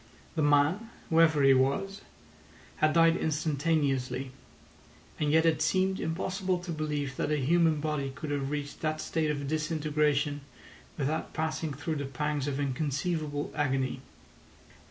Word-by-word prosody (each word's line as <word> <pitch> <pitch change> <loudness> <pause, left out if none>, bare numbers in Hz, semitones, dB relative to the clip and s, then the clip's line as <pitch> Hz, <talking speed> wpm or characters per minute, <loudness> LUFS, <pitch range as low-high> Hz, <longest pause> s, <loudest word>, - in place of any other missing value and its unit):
The 160 - -1
man, 145 +9 +3 0.2
whoever 160 -3 +5
he 135 0 +7
was, 140 +10 +1 0.8
had 155 0 +3
died 165 0 +5
instantaneously; 140 -5 0 0.9
and 150 -1 +1
yet 160 +1 +4
it 160 -2 +2
seemed 190 0 +1
impossible 185 +3 -1
to 175 0 -6
believe 150 -4 -3
that - - -1
a 150 - +1
human 160 +2 +3
body 150 -2 -2
could 135 +3 -6
have 140 -2 -1
reached 145 -1 -4
that 155 0 -1
state 160 -1 -1
of 145 -2 -2
disintegration 150 -1 0 0.6
without 150 +2 -2
passing 160 0 -2
through 145 +3 -3
the 140 - -3
pangs 145 +1 -2
of 140 -1 -2
inconceivable 145 +2 -2
agony. 135 -2 0
150 Hz, 135 wpm, -29 LUFS, 140-160 Hz, 0.9 s, he